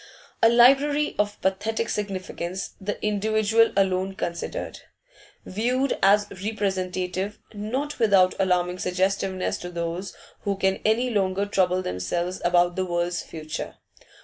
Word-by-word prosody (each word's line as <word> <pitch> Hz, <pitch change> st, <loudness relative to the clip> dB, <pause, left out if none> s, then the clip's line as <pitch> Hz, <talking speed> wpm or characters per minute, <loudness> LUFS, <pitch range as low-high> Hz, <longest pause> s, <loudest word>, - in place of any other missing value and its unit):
A 225 Hz, -, +7 dB
library 275 Hz, +5 st, +4 dB
of 205 Hz, 0 st, 0 dB
pathetic 210 Hz, +4 st, 0 dB
significance, 190 Hz, -3 st, -4 dB
the 205 Hz, +2 st, -3 dB
individual 215 Hz, +2 st, +2 dB
alone 190 Hz, 0 st, +1 dB
considered. 175 Hz, -, -4 dB, 0.7 s
Viewed 250 Hz, +7 st, 0 dB
as 205 Hz, +1 st, +5 dB, 0.2 s
representative, 190 Hz, -2 st, -2 dB, 0.2 s
not 255 Hz, +9 st, -3 dB
without 195 Hz, -5 st, +5 dB
alarming 180 Hz, -1 st, +1 dB
suggestiveness 190 Hz, +1 st, -1 dB
to 175 Hz, -, -6 dB
those 170 Hz, +2 st, -4 dB, 0.2 s
who 200 Hz, -2 st, -2 dB
can 190 Hz, 0 st, +1 dB
any 235 Hz, +4 st, +2 dB
longer 195 Hz, -2 st, +1 dB
trouble 185 Hz, -2 st, +1 dB
themselves 170 Hz, -, -3 dB
about 175 Hz, 0 st, +3 dB
the 185 Hz, -, -1 dB
world's 175 Hz, 0 st, -1 dB
future. 155 Hz, -1 st, -6 dB
195 Hz, 120 wpm, -25 LUFS, 180-215 Hz, 0.7 s, A